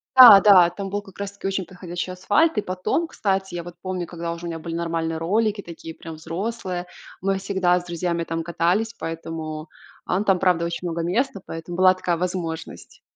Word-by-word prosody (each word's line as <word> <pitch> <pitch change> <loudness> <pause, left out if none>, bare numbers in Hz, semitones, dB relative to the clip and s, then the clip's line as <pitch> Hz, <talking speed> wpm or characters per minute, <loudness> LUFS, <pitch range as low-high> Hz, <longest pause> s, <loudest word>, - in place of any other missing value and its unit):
да-да, 200 -7 +10
там 195 +2 -6
был 205 +1 -1
как 195 -2 -16
раз 200 0 -4
таки 200 -1 -6
очень 195 -1 -1
подходящий 180 0 -6
асфальт. 205 - +2
И - - 0
потом, 185 - -1
кстати, 190 - -1
я 170 - -4
вот 175 +1 -9
помню, 185 -2 -3
когда 170 0 -5
уже 170 +1 -6
у - - -3
меня 165 -1 -5
были 165 +1 -5
нормальные 165 -1 -2
ролики, 205 +5 0
такие 165 -2 -9
прям 165 - -9
взрослые, 180 +2 -4 0.4
мы 195 +1 0
всегда 190 -2 +1
с 175 - -12
друзьями 170 0 -2
там 165 0 -3
катались, 180 +7 0
поэтому 165 -3 -6 0.4
ан 195 +4 0
правда 180 -3 +3
очень 170 +1 -3
много 170 0 -2
места, 195 +5 -1
поэтому 165 +2 -7
была 185 0 +6
такая 180 -2 -1
возможность. 175 -2 -5
180 Hz, 185 wpm, -23 LUFS, 170-195 Hz, 0.4 s, да-да